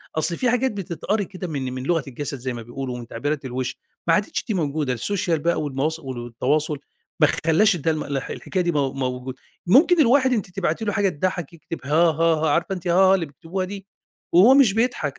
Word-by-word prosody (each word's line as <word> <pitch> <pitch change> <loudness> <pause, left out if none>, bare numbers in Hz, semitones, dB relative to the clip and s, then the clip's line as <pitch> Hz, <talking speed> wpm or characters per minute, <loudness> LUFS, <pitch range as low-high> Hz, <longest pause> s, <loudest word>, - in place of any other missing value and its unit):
أصل 165 +2 0
في 250 - +1
حاجات 250 +2 +1
بتتقري 200 +1 -2
كده 185 0 -7
من 135 -5 -3
من 130 0 -5
لغة 165 +1 +1
الجسد 140 +1 -5
زي 130 0 -4
ما 120 - -6
بيقولوا، 125 +2 -5
ومن 120 -1 -8
تعبيرات 145 +5 -3
الوش، 130 0 -3 0.3
ما 165 - +5
عادتش 200 +4 0
دي 220 - -1
موجودة 150 -6 -1
السوشيال 170 - -1
بقى 170 +1 0
والمواص 150 +2 -2
والتواصل 135 +3 -2 0.4
ما 155 - +6 0.2
خلّاش 180 +6 +4
الد 165 -2 -6
الح 145 -4 -1
الحكاية 185 -2 -2
دي 175 - +1
مو 140 -4 0
موجودة، 130 -1 -4 0.3
ممكن 315 - +5
الواحد 260 0 +4
أنتِ 215 -6 -2
تبعتي 180 +2 -2
له 205 - -1
حاجة 200 -1 +2
تضحّك 175 0 -3
يكتب 165 0 -8
هاهاها 160 +1 +3
عارفة 170 +5 +1
أنتِ 180 -1 -7
هاها 190 +2 +5
اللي 180 -3 -1
بيكتبوها 165 +6 -5
دي؟ 195 0 -8 0.5
وهو 195 +10 +8
مش 270 -7 +5
بيضحك 220 - -1
165 Hz, 195 wpm, -23 LUFS, 135-190 Hz, 0.5 s, وهو